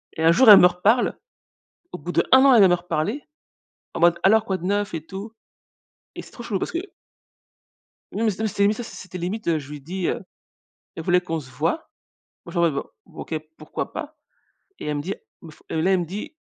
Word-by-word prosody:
Et 160 Hz, -, -3 dB
un 165 Hz, -, +6 dB
jour, 225 Hz, +8 st, +6 dB
elle 205 Hz, -, +11 dB
me 180 Hz, -, +8 dB
reparle. 200 Hz, +7 st, +1 dB, 0.8 s
Au -, -, -6 dB
bout 175 Hz, +4 st, -6 dB
d'1 -, -, +2 dB
an, 265 Hz, +1 st, +7 dB
elle 230 Hz, -, +7 dB
vient 195 Hz, -, +7 dB
me 175 Hz, -, +4 dB
reparler, 175 Hz, -, -2 dB, 0.7 s
en -, -, -4 dB
mode: 170 Hz, 0 st, +4 dB
«Alors, 220 Hz, +3 st, +4 dB
quoi 190 Hz, -, -1 dB
de 180 Hz, -, -11 dB
neuf, 205 Hz, 0 st, -1 dB
et 160 Hz, -2 st, -5 dB
tout»? 195 Hz, +6 st, -8 dB, 0.8 s
Et -, -, -6 dB
c'est -, -, -16 dB
trop -, -, -11 dB
chelou 215 Hz, -4 st, -2 dB
parce -, -, -3 dB
que 335 Hz, -, -2 dB, 1.3 s
oui 210 Hz, -, -4 dB
mais 225 Hz, -, +3 dB
c'était 200 Hz, 0 st, 0 dB
mais 210 Hz, -, +2 dB
ça, 240 Hz, -, -6 dB
c'était 185 Hz, -4 st, -9 dB
limite. 185 Hz, +5 st, -4 dB
Heu, 165 Hz, -2 st, +2 dB
je 145 Hz, 0 st, -11 dB
lui 150 Hz, -1 st, -8 dB
dis, 180 Hz, +5 st, -4 dB
heu -, -, -2 dB, 0.7 s
elle 165 Hz, -, -6 dB
voulait 180 Hz, +2 st, +3 dB
qu'on 165 Hz, -2 st, -3 dB
se 135 Hz, -4 st, -12 dB
voie. 160 Hz, -, -2 dB, 0.6 s
Moi, 170 Hz, -, -10 dB
je 175 Hz, -, -3 dB
lui 170 Hz, -, +4 dB
réponds: 140 Hz, -4 st, -2 dB, 0.2 s
«OK, -, -, -8 dB, 0.2 s
pourquoi 155 Hz, -, -6 dB
pas». 310 Hz, 0 st, -7 dB, 0.6 s
Et -, -, -7 dB
elle 150 Hz, -1 st, -1 dB
me 145 Hz, -, -2 dB
dit: 190 Hz, +6 st, -4 dB, 0.3 s
«Faut» 155 Hz, -, -17 dB
et 160 Hz, -, -1 dB
là 185 Hz, +4 st, +2 dB
elle 185 Hz, -, +3 dB
me -, -, -3 dB
dit: 200 Hz, -, -7 dB
180 Hz, 225 wpm, -23 LUFS, 165-210 Hz, 1.3 s, elle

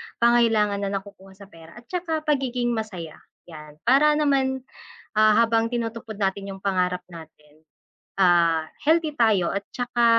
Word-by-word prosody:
pangangailangan 225 Hz, -4 st, +3 dB
na 200 Hz, -1 st, -2 dB
nakukuha 195 Hz, -1 st, -9 dB
sa 200 Hz, -, -14 dB
pera 165 Hz, 0 st, -15 dB
at 240 Hz, -, -13 dB
tsaka 330 Hz, -4 st, -2 dB
pagiging 255 Hz, -5 st, 0 dB
masaya, 195 Hz, -9 st, -5 dB, 0.3 s
yan. 150 Hz, -3 st, -12 dB
Para 285 Hz, +5 st, +4 dB
naman, 270 Hz, -3 st, +1 dB, 0.5 s
ah, 215 Hz, 0 st, +5 dB
habang 230 Hz, 0 st, +1 dB
tinutupad 225 Hz, -2 st, -5 dB
natin 195 Hz, 0 st, -2 dB
yung 195 Hz, -, -9 dB
pangarap 180 Hz, -2 st, 0 dB
natin, 155 Hz, -3 st, -15 dB, 0.5 s
ah, 170 Hz, -4 st, +3 dB, 0.2 s
healthy 315 Hz, 0 st, +2 dB
tayo 215 Hz, -9 st, +2 dB
at 200 Hz, -, -2 dB
tsaka 245 Hz, -1 st, -1 dB
215 Hz, 140 wpm, -24 LUFS, 185-245 Hz, 0.5 s, ah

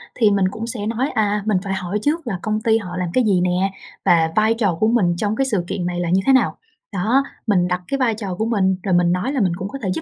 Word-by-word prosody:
thì 215 Hz, -4 st, +3 dB
mình 195 Hz, -2 st, +2 dB
cũng 225 Hz, +2 st, -5 dB
sẽ 220 Hz, -4 st, -4 dB
nói, 245 Hz, +5 st, -1 dB
à, 210 Hz, -2 st, 0 dB
mình 210 Hz, -3 st, +2 dB
phải 195 Hz, -1 st, -3 dB
hỏi 190 Hz, +2 st, -2 dB
trước 300 Hz, 0 st, -1 dB
là 190 Hz, -6 st, -3 dB
công 215 Hz, 0 st, -1 dB
ty 225 Hz, 0 st, +3 dB
họ 180 Hz, -4 st, -6 dB
làm 180 Hz, -2 st, -2 dB
cái 255 Hz, -, +3 dB
gì 190 Hz, -4 st, +2 dB
nè 180 Hz, +2 st, +1 dB, 0.3 s
và 160 Hz, -1 st, +4 dB
vai 215 Hz, +1 st, +3 dB
trò 205 Hz, -7 st, 0 dB
của 215 Hz, -, +3 dB
mình 195 Hz, -7 st, +2 dB
trong 210 Hz, +2 st, -1 dB
cái 270 Hz, -, +1 dB
sự 205 Hz, -9 st, 0 dB
kiện 180 Hz, -3 st, -3 dB
này 175 Hz, 0 st, -2 dB
là 175 Hz, -1 st, -1 dB
như 190 Hz, +2 st, +3 dB
thế 270 Hz, -, +5 dB
nào, 260 Hz, -, +2 dB, 0.4 s
đó. 230 Hz, +9 st, +2 dB, 0.2 s
Mình 180 Hz, -4 st, +3 dB
đặt 180 Hz, 0 st, -1 dB
cái 275 Hz, -, -1 dB
vai 245 Hz, -4 st, +1 dB
trò 195 Hz, -5 st, -5 dB
của 220 Hz, -, -1 dB
mình, 190 Hz, -5 st, +1 dB
rồi 190 Hz, -3 st, 0 dB
mình 175 Hz, 0 st, +3 dB
nói 180 Hz, +10 st, -1 dB
là 270 Hz, -, 0 dB
mình 180 Hz, -3 st, +2 dB
cũng 185 Hz, +2 st, -5 dB
có 275 Hz, -, -7 dB
thể 190 Hz, -, -1 dB
giúp 160 Hz, -, -4 dB
205 Hz, 295 wpm, -20 LUFS, 180-225 Hz, 0.4 s, thế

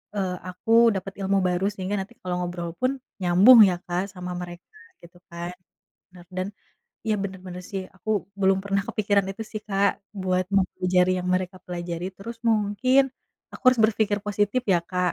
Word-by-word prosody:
eee, 185 Hz, -2 st, -1 dB
aku 185 Hz, +5 st, -5 dB, 0.2 s
dapet 190 Hz, +1 st, -4 dB
ilmu 195 Hz, +1 st, +2 dB
baru 180 Hz, +2 st, 0 dB
sehingga 190 Hz, +1 st, -3 dB
nanti 210 Hz, +5 st, -9 dB
kalau 180 Hz, -1 st, -2 dB
ngobrol 175 Hz, -1 st, -4 dB
pun 255 Hz, +1 st, +3 dB, 0.3 s
nyambung 190 Hz, +8 st, +8 dB
ya, 180 Hz, -, 0 dB
Kak, 180 Hz, +1 st, -1 dB
sama 180 Hz, 0 st, -6 dB
mereka 175 Hz, 0 st, -10 dB, 0.3 s
gitu 170 Hz, +1 st, -15 dB
kan, 170 Hz, +1 st, -5 dB, 0.6 s
bener. 180 Hz, -1 st, -15 dB
Dan 185 Hz, +1 st, -1 dB, 0.6 s
iya, 215 Hz, -, +2 dB
bener 190 Hz, -1 st, -5 dB
bener 180 Hz, 0 st, -7 dB
sih, 195 Hz, -2 st, -3 dB
aku 205 Hz, +4 st, -5 dB, 0.3 s
belum 190 Hz, 0 st, +4 dB
pernah 200 Hz, 0 st, 0 dB
kepikiran 205 Hz, -3 st, +1 dB
itu 225 Hz, -, -6 dB
sih, 215 Hz, -, -4 dB
Kak, 200 Hz, 0 st, +3 dB, 0.3 s
buat 185 Hz, 0 st, +1 dB
mempelajari 185 Hz, -1 st, +2 dB
yang 180 Hz, -, -3 dB
mereka 185 Hz, 0 st, -2 dB
pelajari. 175 Hz, 0 st, -4 dB
Terus 230 Hz, +4 st, -8 dB
mungkin 225 Hz, +5 st, +3 dB, 0.5 s
aku -, -, -11 dB
harus 250 Hz, -, -1 dB
berpikir 215 Hz, -1 st, +2 dB
positif 205 Hz, +4 st, +1 dB
ya, 175 Hz, -, +4 dB
Kak. 180 Hz, -1 st, +1 dB
190 Hz, 170 wpm, -25 LUFS, 180-205 Hz, 0.6 s, nyambung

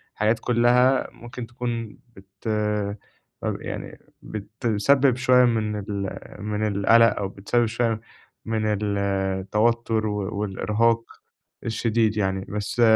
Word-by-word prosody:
حاجات 110 Hz, +2 st, +2 dB
كلّها 125 Hz, +2 st, +3 dB
ممكن 120 Hz, 0 st, -8 dB
تكون 120 Hz, -2 st, -4 dB, 0.2 s
بت 95 Hz, +3 st, -9 dB, 0.9 s
طَب -, -, -2 dB
يعني -, -, -6 dB, 0.2 s
بتسبب 115 Hz, +5 st, +1 dB
شوية 125 Hz, -1 st, +5 dB
من 110 Hz, -3 st, 0 dB
ال 100 Hz, -1 st, -4 dB, 0.2 s
من 105 Hz, 0 st, -1 dB
القلق 115 Hz, +3 st, +4 dB
أو 100 Hz, -, -1 dB
بتسبب 115 Hz, +5 st, 0 dB
شوية 115 Hz, 0 st, 0 dB, 0.4 s
من 110 Hz, -1 st, -1 dB, 0.2 s
التوتر 100 Hz, +3 st, 0 dB
و 100 Hz, -1 st, -3 dB
والإرهاق 110 Hz, +3 st, +1 dB, 0.6 s
الشديد 110 Hz, -1 st, +1 dB
يعني، 95 Hz, -1 st, 0 dB
بس 105 Hz, +4 st, -2 dB
110 Hz, 105 wpm, -24 LUFS, 100-120 Hz, 0.9 s, شوية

